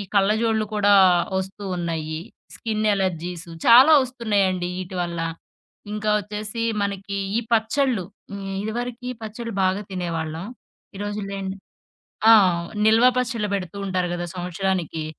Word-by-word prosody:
కళ్ళజోళ్ళు 215 +2 +2
గూడా 205 -1 +4 0.4
ఒస్తూ 190 +2 -6
ఉన్నాయి. 160 -2 -3 0.3
స్కిన్ 215 -1 -2
ఎలర్జీస్ 175 -3 -3 0.2
చాలా 255 +6 +9
ఒస్తున్నాయండి 205 -8 0
ఈటివల్ల. 175 -2 -3 0.7
ఇంకా 210 0 -1
ఒచ్చేసి 210 +2 -5 0.2
మనకి 200 0 -3 0.2
ఈ - - +2
పచ్చళ్ళు. 230 -1 +1 0.3
హ్మ్. 195 -1 -5
ఇదివరకి 240 +3 -4
పచ్చళ్ళు 225 +1 -6
బాగా 185 +2 +1
తినేవాళ్ళం. 165 -1 -3 0.5
ఈ - - -8
రోజులెండి 195 -2 -4 0.7
ఆ! - - +10 0.5
నిల్వా 225 +3 +6
పచ్చళ్ళు 235 -4 -1
బెడుతూ 190 -1 -3
ఉంటారు 185 -2 0
గదా! 175 0 -3
సంవత్సరానికి. 180 -2 -2
200 Hz, 110 wpm, -23 LUFS, 180-220 Hz, 0.7 s, ఆ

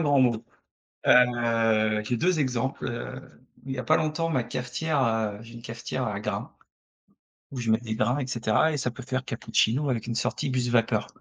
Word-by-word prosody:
grand 145 -4 +4
mot. 120 -2 +2 0.6
Heu, 115 -3 +4
j'ai 120 +3 0
2 175 +5 +2
exemples. 130 0 -1
Heu, 120 +2 -5 0.5
il 135 - -3
y 130 - -4
a - - -1
pas - - +4
longtemps, 160 +2 0
ma 130 -5 +1
cafetière, 125 +5 -1
heu 110 -3 0
j'ai 115 +1 -13
une 115 - -10
cafetière 120 +2 -4
à 105 -2 -3
grains. - - -4 1.0
Où 135 - -5
je 115 -2 0
mets 110 - +5
des 110 -1 -4
grains 120 +5 +1
et 130 - -3
cetera 120 +5 +2
et - - -1
ça 125 -2 -1
peut 125 +1 -9
faire 130 +1 -2
cappuccino 115 +3 +1
avec 115 -4 -1
une 115 - -2
sortie 125 +3 -1
buse 125 -2 0
vapeur 115 -2 +2
120 Hz, 200 wpm, -27 LUFS, 115-130 Hz, 1.0 s, mets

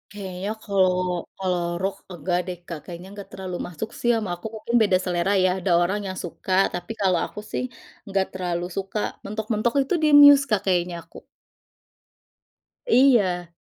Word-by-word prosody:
Kayaknya 190 0 -5
kalau 190 -2 +3 0.5
kalau 180 -2 -1 0.2
rock 195 +1 -1 0.2
enggak 175 +1 -1
deh 180 -1 -4
Kak, 165 -3 -5
kayaknya 175 +1 -9
nggak 200 - -9
terlalu 185 -2 -6
masuk 180 +6 -6
sih 240 - 0
ama 210 -4 -3
aku 175 - -17
mungkin 225 +2 -3
beda 195 -4 +4
selera 180 +1 0
ya, 185 - +4
ada 180 0 -1
orang 190 +4 0
yang 185 - -5
suka 175 +2 -7 0.2
tapi 175 +4 -6
kalau 185 -3 +3
aku - - -9
sih, - - -2 0.4
nggak 195 -1 +1
terlalu 175 -2 -2
suka 195 +2 -3 0.3
mentok-mentok 215 +2 -1
itu 270 - -1
di - - +5
Muse 285 -1 +9
Kak, 205 -2 +2
kayaknya 175 -1 +1
aku. - - -16 1.7
Iya. 200 - +3
190 Hz, 160 wpm, -24 LUFS, 180-210 Hz, 1.7 s, Muse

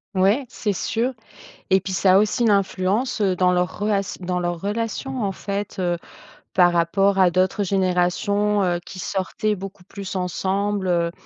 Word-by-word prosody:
Ouais, 200 +9 +3
c'est 210 - -2
sûr. 230 +7 -1 0.6
Et 190 -1 +5
puis 190 -1 -5
ça 185 0 +4
a - - +7
aussi 215 +3 +1
une 225 - +4
influence, 200 +5 0
heu, 190 -2 +2
dans 180 0 +3
leur 180 -1 -1
rela 205 -1 +1 0.2
dans 180 0 -1
leur 175 -1 -2
relation, 230 +5 -3
en 195 - 0
fait, 200 +1 -5
heu, 175 -1 0 0.6
par 175 -1 +5
rapport 195 +4 +2
à 180 -2 +5
d'autres 185 +3 +1
générations, 195 +2 +1
heu, 175 -1 +1
qui 185 - -9
sortaient 200 +3 -1
beaucoup 195 -1 -9
plus 200 -1 -7
ensemble, 190 +2 -1
heu. 170 -1 +1
195 Hz, 170 wpm, -22 LUFS, 180-205 Hz, 0.6 s, a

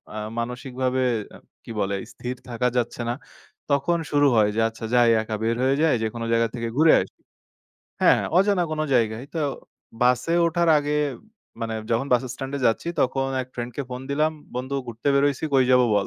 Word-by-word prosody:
আ - - -4 0.2
মানসিকভাবে 125 +2 -2 0.3
অ্যা - - -13 0.2
কি - - -9
বলে, 100 0 0 0.2
স্থির 125 +1 -5
থাকা 125 +1 0
যাচ্ছে 120 0 -1
না, - - +1 0.6
তখন 140 +5 +2
শুরু 145 0 +4
হয় 105 -2 +4
যে, - - 0
আচ্ছা 115 0 -8
যাই, 120 -1 +5
একা 110 0 -4
বের 115 +1 +1
হয়ে 135 +1 +3
যাই, 160 -1 +4
যেকোনো 115 +1 -3
জায়গা 115 0 +3
থেকে 115 -1 -3
ঘুরে 160 +1 +6
আসি। - - -10 0.8
হ্যাঁ, - - +5 0.2
অজানা 195 -2 +3
কোন 155 - -2
জায়গায়। 115 0 +1
তো, - - -2 0.6
বাসে 125 +5 +2
ওঠার 170 +1 +1
আগে 145 0 -2 0.7
মানে 115 -1 -3 0.2
যখন 120 +4 +1
বাস 120 - +4
স্ট্যান্ড 135 +2 -6
এ - - -7
যাচ্ছি, 115 +8 0
তখন 135 +1 +1 0.2
এক - - -10
ফ্রেন্ড 120 0 -5
কে 140 - -1
ফোন 125 0 -5
দিলাম, 155 +2 +1 0.2
বন্ধু 130 +2 -3
ঘুরতে 120 +3 -3
বের 140 - +4
হইছি, 145 +1 -1
কই 130 -1 +5
যাবো 125 -1 +5
বল। 100 -2 +1
125 Hz, 190 wpm, -24 LUFS, 115-140 Hz, 0.8 s, ঘুরে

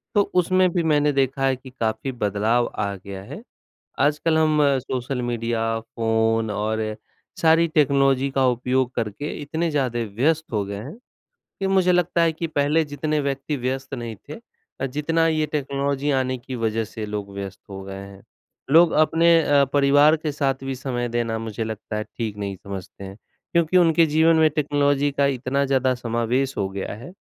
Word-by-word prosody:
तो 205 - +6 0.2
उसमें 185 +1 +2
भी 175 - +1
मैंने 150 0 +3
देखा 135 0 +1
है 135 -1 +2
कि 130 +1 -13
काफ़ी 115 0 -3
बदलाव 110 +1 0
आ 100 0 -1
गया 95 0 -9
है। 210 - -9 0.6
आजकल 155 +2 +2
हम 155 -1 +3 0.2
सोशल 130 0 -3
मीडिया, 115 -1 -1
फ़ोन 115 0 0
और 110 +1 -2 0.4
सारी 165 +1 +5
टेक्नोलॉजी 140 -3 +2
का 135 -1 +2
उपयोग 125 +1 0
करके 115 +6 -3
इतने 160 +3 -2
ज़्यादा 130 -5 -1 0.2
व्यस्त 160 +5 +2
हो 105 -2 0
गए 100 +1 -6
हैं, 125 - -8 0.6
कि 195 - 0
मुझे 190 -2 +3
लगता 175 -1 +2
है 165 -1 +3
कि 165 +1 -4
पहले 155 +1 +1
जितने 150 +1 -2
व्यक्ति 140 +1 -2
व्यस्त 135 +1 -3
नहीं 115 -4 -6
थे 150 - -6 0.5
अ, - - 0
जितना 150 +5 0
ये 155 -1 +1
टेक्नोलॉजी 140 -1 -1
आने 130 0 -1
की 130 +2 -8
वजह 115 -1 -1
से 110 0 -7
लोग 105 -1 -5
व्यस्त 100 -1 -7
हो 95 0 -7
गए 95 0 -7
हैं। 100 0 -11 0.5
लोग 165 +2 +6
अपने 165 +2 +4
अ, 145 -2 +4
परिवार 145 +2 +5
के 155 -1 -4
साथ 135 -2 -1
भी 135 0 -3
समय 125 -2 -3
देना 115 -1 -1
मुझे 110 0 -4
लगता 110 0 -5
है 105 - -2
ठीक 110 -3 -3
नहीं 100 -1 -4
समझते 100 +1 -9
हैं, 95 +1 -9 0.4
क्योंकि 170 +1 +2
उनके 165 -2 +5
जीवन 160 +2 +4
में 160 -1 +4
टेक्नोलॉजी 145 -1 +1
का 140 0 +2
इतना 135 +3 0
ज़्यादा 130 -1 +2
समावेश 120 +3 -1
हो 100 -1 -1
गया 95 +1 -5
है 120 +11 -10
135 Hz, 180 wpm, -23 LUFS, 115-150 Hz, 0.6 s, तो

